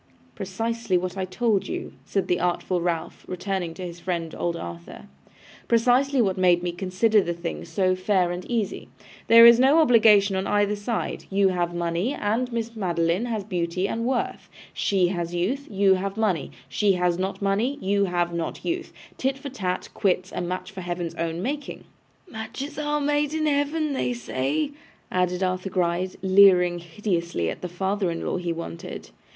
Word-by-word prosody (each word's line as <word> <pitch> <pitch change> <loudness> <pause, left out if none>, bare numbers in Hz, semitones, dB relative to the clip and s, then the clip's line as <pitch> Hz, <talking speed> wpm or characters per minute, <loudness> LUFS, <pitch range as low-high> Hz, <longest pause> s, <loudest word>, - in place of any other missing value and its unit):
'Precisely 225 - -1
what 180 +1 -3
I 190 -1 -2
told 205 +2 0
you,' - - -5
said 195 - -1
the 180 - +1
artful 180 0 0
Ralph, 170 -1 -3
turning 180 -3 -3
to 185 - -6
his 175 0 -8
friend, 170 -2 -3
old 170 -1 -2
Arthur. 85 - -8 0.6
'Precisely 250 +4 +3
what 190 -2 -1
made 175 -1 +4
me 175 - -1
consider 190 +4 +2
the 170 -2 -3
thing 170 0 -5
so 185 +3 +1
fair 185 -1 +1
and 175 +1 -4
easy. 230 -4 -2 0.4
There 230 0 +9
is 235 0 +9
no 270 +5 +5
obligation 220 -9 +5
on 190 +1 -1
either 205 0 +2
side. 210 +2 -3
You 195 0 +3
have 175 -1 -1
money, 175 +9 -1
and 230 +5 -1
Miss 230 0 -3
Madeline 175 0 0
has 225 -4 -2
beauty 180 -1 -1
and 230 +2 -2
worth. 255 +1 -2 0.2
She 185 -3 +2
has 175 -1 -3
youth, 245 +12 -1
you 195 -1 +4
have 195 +2 -2
money. 195 -9 0 0.2
She 205 -2 +2
has 180 -1 +1
not 190 +1 -2
money, 210 +8 0
you 200 +1 +1
have 175 -2 -1
not 170 -1 -4
youth. 345 +1 -2 0.3
Tit 265 +1 0
for 280 +1 -7
tat, 185 -8 -3
quits, 185 -2 0
a - - -3
match 180 +3 -4
of 195 - -24
Heaven's 175 -2 -4
own 165 +1 -3
making!' 285 +2 -4 0.4
'Matches 270 +3 -6
are 295 0 0
made 295 +1 +1
in 310 -1 0
Heaven, 295 +1 +1
they 250 -2 -1
say,' 155 - -2 0.4
added 180 0 0
Arthur 185 +1 -1
Gride, 180 0 -1
leering 185 -2 +6
hideously 170 - -2
at - - -8
the 180 - -4
father 190 +2 -1
in 165 0 -4
law - - -1
he 175 -1 -2
wanted. 165 - -7
190 Hz, 175 wpm, -25 LUFS, 175-225 Hz, 0.6 s, There